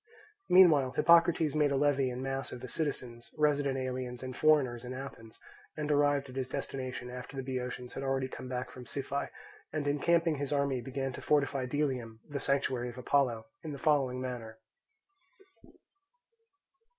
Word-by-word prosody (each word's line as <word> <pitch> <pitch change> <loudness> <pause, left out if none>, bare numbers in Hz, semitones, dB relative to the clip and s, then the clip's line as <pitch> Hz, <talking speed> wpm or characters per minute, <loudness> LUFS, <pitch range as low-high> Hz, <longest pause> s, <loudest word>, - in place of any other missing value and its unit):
Meanwhile 155 -8 +6
Hippocrates 165 0 +5
made 150 -2 +3
a - - +2
levy 135 -2 +2
in 125 +1 -4
mass 135 0 -3
of 125 - -6
the 130 - -6
citizens, 120 -4 -4
resident 145 -3 +2
aliens, 130 -1 -4
and 130 -1 -5
foreigners 135 -6 +3
in 125 +1 -6
Athens, 130 -4 -9 0.4
and 150 0 -1
arrived 145 -1 +3
at 130 - -11
his 130 -1 -2
destination 130 -2 -4
after 125 +2 -8
the 135 - -2
Boeotians 125 -1 -4
had - - -5
already 135 -1 0
come 130 0 -8
back 125 0 -3
from 125 -1 -10
Siphae, 140 0 -3 0.4
and 150 -2 -2
encamping 165 +2 +2
his 140 0 -3
army 140 -3 +1
began 135 +1 -3
to - - -7
fortify 140 -3 +1
Delium, 125 -5 -2
the 145 -1 -4
sanctuary 135 -3 0
of 120 - -10
Apollo, 125 -3 +1 0.2
in 155 -2 -6
the - - -5
following 135 -3 +2
manner. 120 -4 -5
135 Hz, 160 wpm, -31 LUFS, 125-145 Hz, 0.4 s, Meanwhile